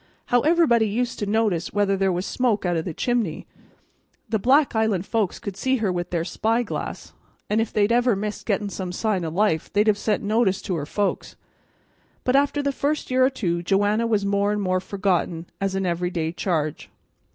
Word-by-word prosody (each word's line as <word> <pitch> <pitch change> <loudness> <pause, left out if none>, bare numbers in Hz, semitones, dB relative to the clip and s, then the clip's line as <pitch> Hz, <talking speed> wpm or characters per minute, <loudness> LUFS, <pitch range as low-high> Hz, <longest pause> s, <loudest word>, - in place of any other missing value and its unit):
"How 245 0 +3
everybody 300 -8 +4
used 240 +3 -2
to 205 - -2
notice 205 -5 0
whether 205 -1 +2
there 195 0 +1
was 180 +1 -2
smoke 235 -6 0
out 175 -1 +1
of 160 - -2
the 175 - -4
chimney! 235 -10 -1 0.8
The 220 -1 0
Black 270 +5 +3
Island 220 -4 +1
folks 215 -5 -1
could 200 -2 -6
see 260 +7 +1
her 215 -5 0
with 175 0 -3
their 170 -2 -1
spy 225 +6 0
glass, 225 - -6 0.4
and 215 +1 +3
if 225 - -2
they'd 210 +1 +2
ever 240 -1 +3
missed 210 +2 -5
getting 205 -1 0
some 185 -2 -4
sign 200 -2 -1
o' 165 - -2
life 165 -2 0
they'd 205 +2 +3
have 210 -2 +2
sent 210 -2 0
notice 205 -2 +2
to 185 - -2
her 145 -3 -4
folks. 205 +3 -2 0.9
But 255 - +1
after 285 +1 +2
the 280 - +1
first 285 +1 -2
year 255 0 +4
or 260 - +5
two 175 -10 -2
Joanna 205 +5 +1
was 210 -3 +1
more 200 +1 +1
and 210 - -1
more 185 -2 +1
forgotten 185 -3 -1 0.2
as 195 -1 -1
an 195 0 -1
every 175 0 -1
day 165 -3 -2
charge. 160 -4 -2
205 Hz, 205 wpm, -23 LUFS, 185-230 Hz, 0.9 s, or